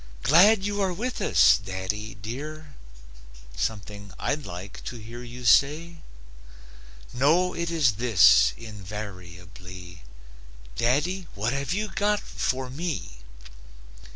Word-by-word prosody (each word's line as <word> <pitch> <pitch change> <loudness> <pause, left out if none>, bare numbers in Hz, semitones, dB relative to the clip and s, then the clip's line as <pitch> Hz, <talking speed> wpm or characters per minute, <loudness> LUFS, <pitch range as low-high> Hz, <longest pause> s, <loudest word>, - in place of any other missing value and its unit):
"Glad 190 +7 +6
you 205 0 -1
are 190 -1 +1
with 240 +8 -4
us, - - +5
daddy, 95 +3 -4
dear?" 145 +8 -8 0.8
Something 100 -1 -4
I'd 145 0 -2
like 90 +2 -8
to - - -5
hear 115 +2 -9
you 125 0 -9
say? 155 +7 +3 1.2
No, 165 +8 +3
it 170 0 -3
is 145 -11 +2
this, 115 -6 +5
invariably: 90 -4 -10 0.7
"Daddy, 160 - 0
what 110 +5 -1
have 140 0 -3
you 210 +4 -1
got 205 +2 0
for 130 -7 -3
me?" 135 - -5
125 Hz, 110 wpm, -26 LUFS, 100-170 Hz, 1.2 s, Glad